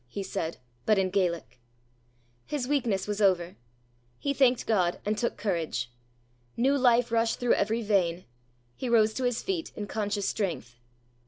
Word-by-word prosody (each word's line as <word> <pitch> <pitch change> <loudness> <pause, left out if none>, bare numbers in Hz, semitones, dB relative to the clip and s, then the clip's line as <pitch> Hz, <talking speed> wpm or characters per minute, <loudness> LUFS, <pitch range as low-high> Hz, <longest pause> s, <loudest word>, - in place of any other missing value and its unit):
he 195 +11 -5
said, 170 -4 -3 0.3
but 215 - +3
in 190 -1 +1
Gaelic. 170 - -1 0.9
His 285 -4 -2
weakness 235 -10 0
was 210 0 -2
over. 180 -3 +2 0.6
He 280 - -1
thanked 255 -3 +3
God, 180 -6 +1
and 210 +1 +1
took 235 +2 -1
courage. 160 - -2 0.7
New 270 +4 +3
life 245 -3 +3
rushed 230 0 +1
through 245 -1 +3
every 225 +3 0
vein. 185 -4 +1 0.5
He 255 - -4
rose 220 -2 +4
to 255 - -2
his 245 -1 0
feet 370 -4 -2
in 210 - -4
conscious 205 -1 -2
strength. 125 - -3
210 Hz, 155 wpm, -28 LUFS, 185-240 Hz, 0.9 s, rose